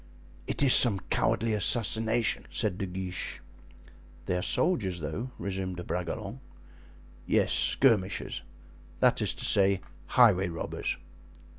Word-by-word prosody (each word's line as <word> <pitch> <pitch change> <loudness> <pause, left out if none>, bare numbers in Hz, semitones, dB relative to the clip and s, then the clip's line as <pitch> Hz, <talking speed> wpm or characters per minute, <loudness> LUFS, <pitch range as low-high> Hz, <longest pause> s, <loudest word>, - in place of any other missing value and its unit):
"It - - -1
is 135 - +6
some 105 -6 +6
cowardly 115 0 0
assassination," 110 +1 0
said 100 -4 -1
De 100 - -3
Guiche. 90 0 -5 0.9
"They 90 - -1
are 90 - -1
soldiers, 95 - +1
though," 80 +11 -5
resumed 95 -2 -4
De 90 - -6
Bragelonne. 100 +8 -5 0.9
"Yes, - - +2
skirmishers; 105 -8 +2 0.6
that - - +3
is - - 0
to - - -3
say, 100 -1 +2 0.3
highway 100 -7 +4
robbers." 85 -1 -4
100 Hz, 120 wpm, -28 LUFS, 90-115 Hz, 0.9 s, is